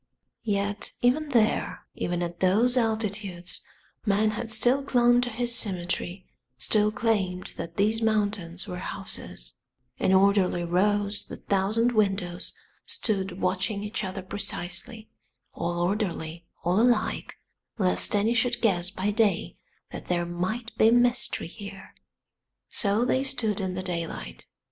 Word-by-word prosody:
Yet 205 0 0
even 290 +5 +3
there, 230 -4 +1
even 175 0 -2
at 175 0 -5
those 215 +7 +3
altitudes, 210 -6 -2 0.4
man 210 +1 +2
had 225 +1 -4
still 245 +5 +4
clung 245 -3 +4
to 245 - -1
his 240 +1 0
symmetry, 185 -2 0 0.3
still 210 - +3
claimed 200 -5 -1
that 170 0 -6
these 215 +3 +2
mountains 205 -5 0
were 180 - -5
houses; - - -5 0.4
in - - +2
orderly 190 -2 +4
rows 205 +4 +1
the - - -8
thousand 210 +5 +1
windows 195 -5 0 0.3
stood 195 -3 -2
watching 190 +3 0
each 210 +1 -3
other 190 0 -4
precisely, 200 +3 -3 0.5
all 170 0 -2
orderly, 175 -3 -2 0.2
all 180 +5 +3
alike, 240 -3 +1 0.4
lest 190 0 +2
any 210 +3 +3
should 240 +1 +2
guess 180 -6 +2
by 195 +1 -1
day 210 -2 +1 0.4
that - - -8
there 175 -1 0
might 185 +7 -3
be 220 - +7
mystery 245 +1 +3
here. 200 +2 -10 0.8
So 210 +3 +1
they 260 +1 +2
stood 245 -7 0
in 185 -2 -2
the 185 - -3
daylight. 170 -3 -5
205 Hz, 130 wpm, -27 LUFS, 180-225 Hz, 0.8 s, be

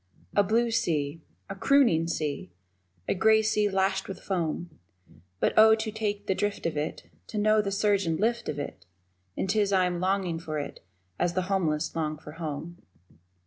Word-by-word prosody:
A 205 - +6
blue 230 +4 +2
sea 155 -7 0 0.3
a - - -5
crooning 195 - +3
sea 150 - -3 0.6
A - - +2
grey 220 +3 +4
sea 215 -1 +2
lashed 190 0 0
with 190 -2 -6
foam 170 -3 -3 0.6
But, - - +2
Oh, 220 0 +8
to 220 0 -3
take 205 -2 -3
the 190 - +1
drift 205 +1 -2
of 165 - -1
it, 150 +2 -4 0.2
To 215 - -6
know 215 +1 +4
the 200 -1 -3
surge 200 -2 +2
and 160 -1 0
lift 235 +2 0
of 145 - -3
it, 145 - -6 0.5
And - - -1
'tis 200 0 +2
I 185 -2 +4
am 175 -1 -1
longing 185 -2 0
for 155 -2 -4
it 145 - -6 0.4
as 175 -1 +1
the 185 - +1
homeless 155 -5 0
long 155 -2 -1
for 150 - -11
home. 165 +1 -6
190 Hz, 185 wpm, -28 LUFS, 165-210 Hz, 0.6 s, Oh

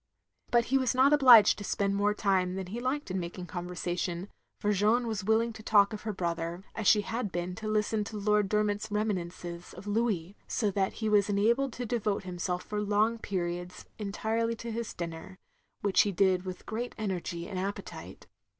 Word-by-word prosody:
But 235 -1 +3
he 270 - +5
was 255 -1 +1
not 265 +3 +5
obliged 250 -9 +8
to - - -6
spend 200 0 0
more 205 +1 +2
time 185 -3 +1
than 190 -1 -4
he 210 +7 -5
liked 255 -2 -2
in 185 - -1
making 175 +1 -6
conversation, 175 +1 -4 0.3
for 210 - 0
Jeanne 215 +5 +3
was 220 -3 -3
willing 225 +3 +2
to 220 - -10
talk 210 -1 +4
of 210 - -5
her 220 - -3
brother, 170 -1 -3
as 220 -3 -2
she 210 - +6
had 225 -1 -3
been 175 +1 -3
to 220 -1 -5
listen 215 0 +1
to 215 0 -6
Lord 210 -1 +2
Dermot's 210 0 0
reminiscences 180 -4 -3
of 185 - -10
Louis, 205 -4 -1
so 210 -3 0
that 190 0 0
he 220 - -3
was 210 -1 +3
enabled 230 +6 +2
to 245 - -4
devote 215 -4 -1
himself 180 0 -3
for 210 0 -3
long 210 +3 +1
periods, 180 -3 -4
entirely 220 +3 -1
to 230 +1 -6
his 230 0 -4
dinner, 170 +2 -6 0.4
which 200 -2 +4
he 205 - +1
did 185 0 +2
with 185 -1 -7
great 235 +3 -4
energy 180 -4 -3
and 190 -3 -4
appetite. 190 -4 -6
205 Hz, 190 wpm, -30 LUFS, 185-220 Hz, 0.4 s, obliged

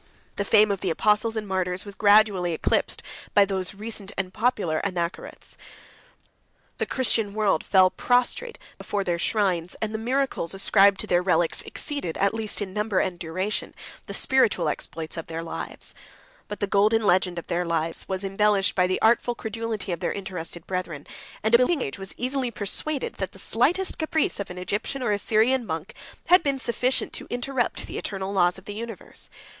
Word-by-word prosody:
The 200 - -1
fame 210 0 +5
of 195 - -2
the 190 - -1
apostles 210 +6 +2
and 215 -2 -3
martyrs 185 -1 -1
was 200 - -7
gradually 205 -4 +4
eclipsed - - 0 0.3
by 205 - +7
these 190 -1 -2
recent 210 -1 -5
and 185 -1 -3
popular 210 -8 0
Anachorets; 175 -3 -4 1.2
the - - -1
Christian 225 -5 +1
world 205 -7 +2
fell 185 -2 +5
prostrate 255 - +1 0.2
before 205 -1 -2
their 175 -2 -1
shrines; 185 -4 0
and 220 0 -2
the 220 - -2
miracles 250 -7 -1
ascribed 195 0 +4
to - - -3
their 175 0 +2
relics 175 -2 +1
exceeded, 285 - -3
at 200 +1 +2
least 220 -2 0
in 190 -2 -8
number 210 -1 -1
and 175 -2 -1
duration, 185 +6 -3 0.3
the - - -3
spiritual 230 - +3
exploits 160 +2 -4
of 165 - -5
their 165 0 -5
lives. 165 - -5 0.5
But 210 - -7
the - - +2
golden 210 +3 +3
legend 180 -2 +2
of 170 - -5
their 175 +1 -1
lives 165 -1 0
73 - - -6
was 190 +1 -1
embellished 195 -1 +2
by 180 -1 +2
the 185 - -1
artful 235 +2 +3
credulity 220 -3 -4
of 170 - -2
their - - -1
interested 180 -4 -4
brethren; 180 -6 -4 0.4
and 220 +2 +1
a 235 - +8
believing 260 +3 +2
age 135 - -5
was 195 0 -5
easily 255 0 -1
persuaded, 235 +7 -2
that 190 - -3
the - - -13
slightest 305 - +1
caprice 315 -5 0
of 200 - -4
an 180 - -8
Egyptian 205 +8 -3
or 235 - +1
a 205 - +1
Syrian 235 +5 +2
monk 165 -3 -5 0.3
had 360 +1 +6
been 280 -1 0
sufficient 255 0 +1
to - - -6
interrupt 245 0 -1
the - - -5
eternal 195 -1 -4
laws 175 -2 +3
of - - -14
the 205 - -6
universe. 225 -2 -7
200 Hz, 185 wpm, -25 LUFS, 180-225 Hz, 1.2 s, a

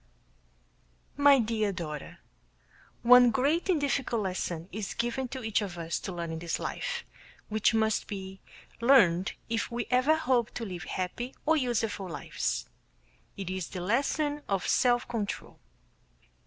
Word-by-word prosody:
My 285 -1 +6
Dear 220 -3 0
Daughter: 155 -5 -6 0.9
One 245 0 +8
great 290 - +1
and 345 -5 +3
difficult 265 -5 0
lesson 180 -3 -3
is 210 -1 -5
given 240 +3 -1
to 260 0 -7
each 220 -1 +1
of 190 -4 -5
us 165 0 -2
to 195 - -5
learn 170 -2 -4
in 160 - -4
this 170 0 -2
life, 485 -1 -4 0.4
which 215 +2 +2
must 220 -1 +1
be 190 -1 -7 0.4
learned 195 -8 +5
if 230 0 -1
we 240 -1 -3
ever 255 +5 +4
hope 255 -7 +1
to 230 - -3
live 180 -4 -6
happy 240 +8 -4
or 320 +1 +4
useful 225 -8 -1
lives. 135 - -3 0.7
It 190 -2 -4
is 185 -3 -3
the 185 - -6
lesson 285 - 0
of 195 -2 0
self 245 -1 +3
control. 225 -4 -4
225 Hz, 145 wpm, -29 LUFS, 185-255 Hz, 0.9 s, One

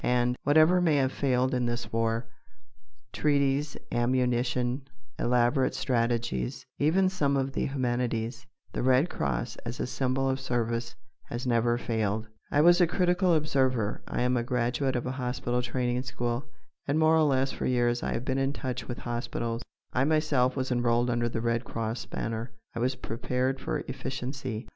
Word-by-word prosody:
And, 125 0 +2
whatever 155 +5 +5
may 165 -4 +3
have 135 -2 +2
failed 130 -2 +1
in 125 -1 +1
this 120 -1 -3
war 115 +1 0 0.9
treaties, 145 0 +1
ammunition, 125 +1 +1 0.3
elaborate 125 +2 +2
strategies, 115 - -1
even 180 +6 +3
some 145 -7 +1
of 135 0 0
the - - 0
humanities 120 -3 -2 0.3
the - - -2
Red 130 +6 +3
Cross 120 -1 -2
as 120 +1 -6
a - - 0
symbol 130 +1 0
of 135 0 0
service 120 -1 -2 0.3
has 120 +2 -5
never 120 -1 +2
failed. 110 -2 -1 0.2
I 145 - +3
was 175 +3 +6
a 175 - +6
critical 180 0 +2
observer. 130 -8 +1
I - - -1
am 125 0 +2
a - - +1
graduate 125 +2 0
of 120 - -1
a 125 - -1
hospital 125 0 -1
training 125 0 -1
school, 120 -1 -2 0.4
and 145 +2 +1
more 160 0 +5
or 160 - +4
less 135 -3 +2
for - - -3
years 120 -1 +2
I - - -1
have 120 - -3
been 135 0 0
in 135 +1 +1
touch 130 -4 -4
with 120 - -4
hospitals. 120 -1 -3 0.3
I 130 - +2
myself 145 -5 +2
was 130 -1 -2
enrolled 120 0 +2
under 120 0 +1
the 115 - -3
Red 115 0 0
Cross 115 0 -4
banner. 115 +1 -4 0.2
I 115 - -4
was 130 +2 +1
prepared 125 +2 -2
for - - -2
efficiency. 130 -3 -4
125 Hz, 165 wpm, -28 LUFS, 120-135 Hz, 0.9 s, was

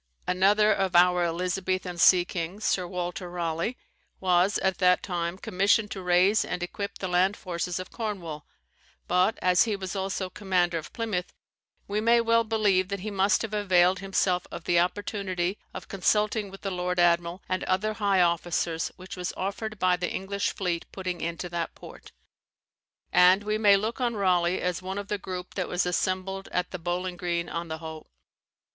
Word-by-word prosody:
Another 205 +4 +4
of 190 -2 -1
our 180 0 +5
Elizabethan 180 +1 -2
sea 175 +1 +6
kings, 180 +5 -5
Sir 180 -2 +1
Walter 180 0 -4
Raleigh, 170 +6 -2 0.4
was 185 +1 +3
at 190 -1 0
that 180 -1 +4
time 175 -1 -3
commissioned 205 +3 +1
to 190 - -5
raise 180 +4 +4
and 180 - -4
equip 200 +3 -5
the 190 - -4
land 185 +3 +2
forces 175 -1 -3
of 185 0 -7
Cornwall; 185 -10 -5 0.6
but, 180 +4 +2
as 180 0 +5
he 220 -3 -1
was 190 -2 -5
also 190 0 -2
commander 180 -3 0
of 155 - -10
Plymouth, 210 -6 -3 0.6
we 210 +1 -1
may 235 +1 +4
well 230 0 +3
believe 210 -4 +2
that 200 -1 -4
he 215 +2 -4
must 200 +2 +2
have 220 -1 -5
availed 185 -3 +3
himself 185 -1 0
of - - -7
the 175 0 +3
opportunity 185 0 -1
of - - -8
consulting 210 +2 +1
with 195 0 -12
the 195 - -3
lord 180 0 -2
admiral 175 +1 +2
and 185 0 -1
other 200 +4 0
high 200 -3 +2
officers 170 -1 0
which 185 0 -9
was 180 0 -3
offered 210 +3 -4
by 185 -1 +3
the 180 0 -3
English 200 +1 -2
fleet 175 -3 -3
putting 185 -2 -4
into 170 +2 -3
that 170 -1 -4
port; - - -13 1.0
and 185 +3 +6
we 215 +1 -1
may 205 -2 +6
look 220 +5 -3
on 240 -2 0
Raleigh 180 -3 +2
as 180 0 -1
one 190 +1 -5
of 205 0 -5
the 210 - -1
group 185 -1 -6
that 185 - -3
was 180 0 0
assembled 185 +2 -1
at 180 0 -1
the 180 - -5
Bowling 175 +1 -3
Green 170 -1 -2
on 170 0 -4
the 160 0 -4
Hoe. 160 -1 -9
185 Hz, 180 wpm, -27 LUFS, 175-200 Hz, 1.0 s, sea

